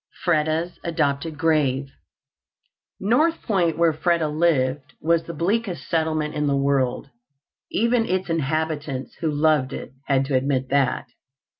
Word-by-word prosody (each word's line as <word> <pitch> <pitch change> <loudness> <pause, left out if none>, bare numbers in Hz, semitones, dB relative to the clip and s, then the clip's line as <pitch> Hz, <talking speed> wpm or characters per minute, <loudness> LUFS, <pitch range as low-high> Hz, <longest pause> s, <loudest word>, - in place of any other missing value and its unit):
Freda's 160 +1 +1
Adopted 155 -1 -1
GraveToC 145 -4 +1 1.1
North 300 +12 +2
Point, 180 -7 +1
where 165 -1 +3
Freda 165 0 +1
lived, 145 -4 +1
was 165 +1 +1
the 170 - -6
bleakest 180 - -1
settlement 155 0 0
in 150 -1 -1
the 140 -1 +2
world. 140 -1 0 0.6
Even 235 +1 +1
its 185 0 -1
inhabitants, 155 -3 -2
who 160 - 0
loved 150 -3 +2
it, - - -7 0.2
had 135 -1 +2
to 135 - -4
admit 130 0 0
that. 140 -2 +1
155 Hz, 130 wpm, -23 LUFS, 140-170 Hz, 1.1 s, where